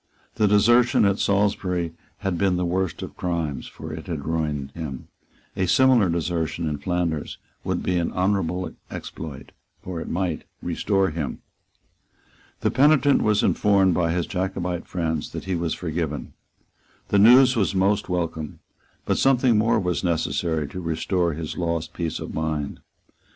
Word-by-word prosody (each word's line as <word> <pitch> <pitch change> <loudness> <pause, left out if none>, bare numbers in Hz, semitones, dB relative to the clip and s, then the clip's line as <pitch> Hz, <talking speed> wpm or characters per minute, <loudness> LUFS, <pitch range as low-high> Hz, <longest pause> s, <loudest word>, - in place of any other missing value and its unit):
The 105 - +4
desertion 120 +3 +4
at 100 0 +2
Salisbury 95 -4 +1 0.3
had 95 -3 -1
been 95 +1 +2
the 90 - 0
worst 90 0 -1
of - - -8
crimes; 80 -6 -2
for - - -8
it - - -8
had - - -4
ruined 75 -4 -2
him. 70 -4 -7 0.5
A 95 - 0
similar 125 -2 +5
desertion 85 0 -1
in 75 -2 -2
Flanders 85 -4 -2 0.3
would - - -2
be 90 - +1
an 85 - -1
honourable 95 -1 0 0.2
exploit; 75 -4 -8 0.3
for 90 -3 -5
it - - -6
might 90 -2 -2 0.2
restore 95 -3 0
him. 75 -3 -4 1.2
The - - +1
penitent 145 0 +4
was 105 -1 +2
informed 100 -3 +3
by 85 -1 +1
his 85 0 0
Jacobite 90 -3 -3
friends 80 -4 -2
that - - -5
he 95 - -2
was 85 -2 -1
forgiven. 80 -3 -3 0.8
The 100 - +3
news 125 +5 +7
was 100 -3 +1
most 95 +2 +2
welcome; 85 -4 -3 0.5
but - - +1
something 130 -3 +4
more 110 +1 +3
was 90 -5 -1
necessary 80 -2 0
to 90 - -6
restore 85 +1 0
his 80 0 -5
lost 85 -2 -2
peace 85 -3 -3
of - - -6
mind. 80 -2 -2
90 Hz, 150 wpm, -24 LUFS, 80-100 Hz, 1.2 s, news